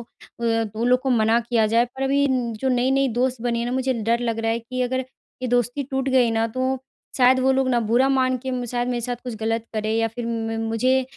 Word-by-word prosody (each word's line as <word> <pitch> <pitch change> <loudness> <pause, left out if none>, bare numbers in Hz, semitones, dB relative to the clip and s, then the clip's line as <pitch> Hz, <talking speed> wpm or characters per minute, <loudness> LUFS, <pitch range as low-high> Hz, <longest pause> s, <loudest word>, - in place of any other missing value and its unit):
अ, - - -9 0.4
दो 225 -1 0
लोग 250 +1 +3
को 265 0 -1
मना 225 -1 +3
किया 230 -2 +1
जाए, 230 +2 +3
पर 265 +2 -8
अभी 280 +1 +2
न 245 -3 0
जो 265 - 0
नई-नई 260 +2 +2
दोस्त 255 -1 0
बनी 235 -1 0
है 235 - -2
ना, 245 - -2
मुझे 260 0 0
डर 235 +2 +1
लग 230 -2 -2
रहा 225 0 0
है 230 - 0
कि 255 +2 -6
अगर 260 +1 -1 0.4
ये 250 - -1
दोस्ती 245 +3 0
टूट 265 0 -1
गई 255 -3 +3
ना, 225 0 +1
तो 260 +3 -1 0.4
शायद 255 +1 +5
वो 265 +1 +3
लोग 265 0 +1
ना 240 -2 +2
बुरा 235 +4 +2
मान 260 -1 +2
के - - -1
म 250 -1 -2
शायद 245 +1 -2
मेरे 245 -1 -1
साथ 245 +1 -3
कुछ 245 -3 -4
गलत 225 +1 -2
करे, 215 0 -1
या 225 0 +1
फिर 230 +1 -6
म 225 -1 -2
मुझे 255 +4 +2
245 Hz, 255 wpm, -23 LUFS, 225-260 Hz, 0.4 s, शायद